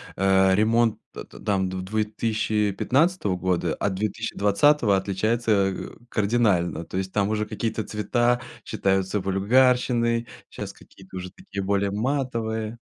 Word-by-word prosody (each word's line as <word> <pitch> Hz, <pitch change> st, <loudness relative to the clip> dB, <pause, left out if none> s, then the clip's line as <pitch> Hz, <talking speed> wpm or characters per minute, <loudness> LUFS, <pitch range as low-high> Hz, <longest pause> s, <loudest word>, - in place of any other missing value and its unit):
а, 95 Hz, 0 st, +4 dB
ремонт 115 Hz, +2 st, +2 dB
т -, -, -7 dB
т -, -, -15 dB
там 95 Hz, -2 st, 0 dB
в 95 Hz, 0 st, -4 dB
2015 110 Hz, -, 0 dB
года, 90 Hz, -3 st, 0 dB
от 100 Hz, -, -1 dB
2020 105 Hz, +3 st, +2 dB
отличается, 110 Hz, +4 st, 0 dB, 0.2 s
а, 95 Hz, -, -7 dB, 0.2 s
кардинально. 100 Hz, -7 st, +1 dB
То 95 Hz, -, -6 dB
есть 95 Hz, 0 st, -3 dB
там 100 Hz, 0 st, +1 dB
уже 105 Hz, 0 st, 0 dB
какие-то 110 Hz, +1 st, -3 dB
цвета 120 Hz, +4 st, 0 dB, 0.2 s
считаются 95 Hz, +1 st, 0 dB
вульгарщиной, 115 Hz, +4 st, +2 dB, 0.2 s
щас -, -, -7 dB
какие-то 95 Hz, -1 st, -14 dB
уже 90 Hz, 0 st, -6 dB
такие 100 Hz, 0 st, -7 dB
более 100 Hz, 0 st, 0 dB
матовые. 115 Hz, -2 st, -2 dB
105 Hz, 125 wpm, -24 LUFS, 95-115 Hz, 0.2 s, а